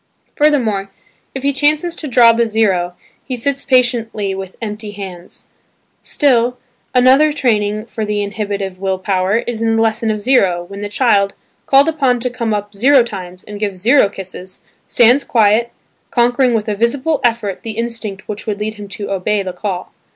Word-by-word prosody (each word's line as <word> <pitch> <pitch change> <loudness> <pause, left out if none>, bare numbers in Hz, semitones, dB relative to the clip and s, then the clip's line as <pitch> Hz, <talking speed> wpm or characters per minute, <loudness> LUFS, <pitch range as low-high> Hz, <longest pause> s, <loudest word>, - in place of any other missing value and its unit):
Furthermore 235 -10 +1 0.5
if 265 - -5
he 280 0 +1
chances 305 +5 +1
to 310 - -4
draw 240 -3 +6
the 230 0 +1
zero 190 -5 0 0.3
he 260 - -4
sits 275 +3 -2
patiently 235 -6 +1
with 190 -1 -7
empty 210 -1 -6
hands. 185 -3 -9 0.6
Still 250 -4 +2 0.4
another 265 +5 +5
training 215 -6 0
for 225 -1 -5
the 210 -1 -1
inhibitive 200 -2 -4
will 190 -1 -1
power 190 +1 0
is 235 -2 -4
in 225 0 +1
"the 225 - +2
lesson 225 0 0
of 215 -1 -1
zero" 200 -7 +2
when 200 +3 -9
the 205 - -4
child, 205 -3 +2 0.3
called 275 +2 +5
upon 275 -6 +1
to 250 0 -1
come 235 -2 -2
up 205 0 -3
zero 260 +5 +5
times 185 -5 -8
and 210 0 -9
give 200 -3 -2
zero 225 +3 +4
kisses, 185 -1 -10 0.3
stands 245 +4 +4
quiet, 225 +1 +2 0.4
conquering 245 0 +2
with 215 -1 -1
a 210 - 0
visible 260 +7 0
effort 225 -5 0
the 225 -1 -6
instinct 230 -4 -4
which 210 +1 -6
would 210 -1 -2
lead 215 +1 -3
him 205 -1 -10
to 200 0 -6
"obey" 195 +2 0
the 185 -1 -5
call. 185 -3 -4
220 Hz, 175 wpm, -16 LUFS, 200-245 Hz, 0.6 s, draw